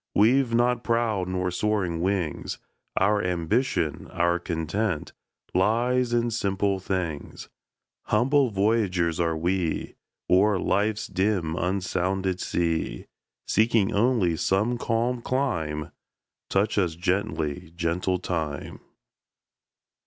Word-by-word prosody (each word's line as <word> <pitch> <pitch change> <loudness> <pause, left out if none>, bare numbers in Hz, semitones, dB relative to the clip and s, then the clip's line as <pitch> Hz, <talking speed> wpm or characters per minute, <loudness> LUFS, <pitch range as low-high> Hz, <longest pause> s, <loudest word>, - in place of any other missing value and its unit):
We've 125 +4 +4
not 120 0 +2
proud 115 -6 0
nor 90 0 -1
soaring 90 -4 0
wings; 90 -4 -1 0.4
Our 105 +2 +3
ambition, 90 - 0
our 85 +1 +1
content, 85 +2 -2 0.4
Lies 120 +6 +2
in 120 0 +1
simple 100 -2 0
things. 90 -6 -4 0.6
Humble 130 +4 +3
voyagers 95 -5 +1
are 85 -1 +1
we, 85 0 -1 0.3
O'er 100 +2 +4
life's 105 +3 0
dim 95 -5 0
unsounded 95 +1 -1
sea, 80 -8 -1 0.4
Seeking 110 -2 +2
only 105 -6 +2
some 105 +7 +1
calm 120 +2 0
clime; 80 - -1 0.6
Touch 100 +2 +1
us 85 -4 0
gently, 85 -4 -2
gentle 90 +2 0
Time! 80 -5 -4
95 Hz, 100 wpm, -26 LUFS, 85-110 Hz, 0.6 s, We've